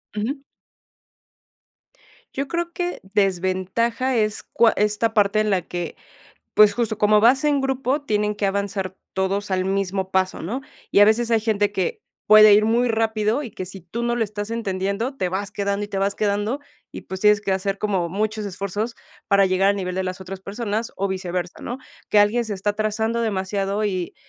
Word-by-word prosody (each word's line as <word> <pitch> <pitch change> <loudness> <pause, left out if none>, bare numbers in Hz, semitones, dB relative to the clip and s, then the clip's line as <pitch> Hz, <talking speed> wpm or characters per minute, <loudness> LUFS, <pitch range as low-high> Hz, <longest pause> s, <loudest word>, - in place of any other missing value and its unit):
Ujú. 270 +7 -3 1.9
Yo 275 +1 -2
creo 340 +1 -2
que 355 0 -3
desventaja 195 +6 0
es 215 -1 0
cua 230 -1 +3
esta 210 +2 +1
parte 210 0 +3
en 215 0 +1
la 190 -2 +2
que, 175 0 -5 0.6
pues, 210 -1 +6
justo, 225 -3 -1
como 210 0 +4
vas 255 +6 +4
en 290 -2 +3
grupo, 270 +1 -1
tienen 210 -5 0
que 205 -1 -1
avanzar 195 -1 -2 0.2
todos 195 +2 -1
al 185 -1 +1
mismo 190 0 -1
paso, 185 0 0
¿no?, 225 +11 -3 0.3
y - - +4
a - - +10
veces 230 +2 +2
hay 225 - +3
gente 210 -2 +1
que 465 - -2 0.3
puede 215 -1 +9
ir 210 +1 +4
muy 235 +3 +2
rápido, 220 +3 0
y 240 - -7
que 185 - -6
si 190 +1 -9
tú 200 +8 -5
no 240 0 0
lo 230 - +1
estás 205 +1 -6
entendiendo, 205 +3 -2
te 185 - -1
vas 190 +2 -3
quedando 200 0 -2
y - - -9
te 195 - -3
vas 200 +1 0
quedando, 210 +6 -1 0.3
y - - -7
pues, 190 0 -7
tienes 210 0 +5
que 200 -2 -1
hacer 195 +1 -1
como 195 -5 0
muchos 215 +3 -2
esfuerzos 200 +4 -3 0.3
para 200 -1 +5
llegar 190 +1 +2
al 200 - 0
nivel 180 -2 -3
de 190 - -1
las 185 +1 -4
otras 190 0 -7
personas, 215 +2 -3
o 200 - -1
viceversa, 180 -2 -4
¿no?, 245 - -5 0.3
que 210 - +4
alguien 215 +4 +3
se 215 -2 -4
está 195 +2 -1
atrasando 215 +2 -1
demasiado, 200 0 -1
y 185 -4 -2
205 Hz, 190 wpm, -22 LUFS, 195-225 Hz, 1.9 s, a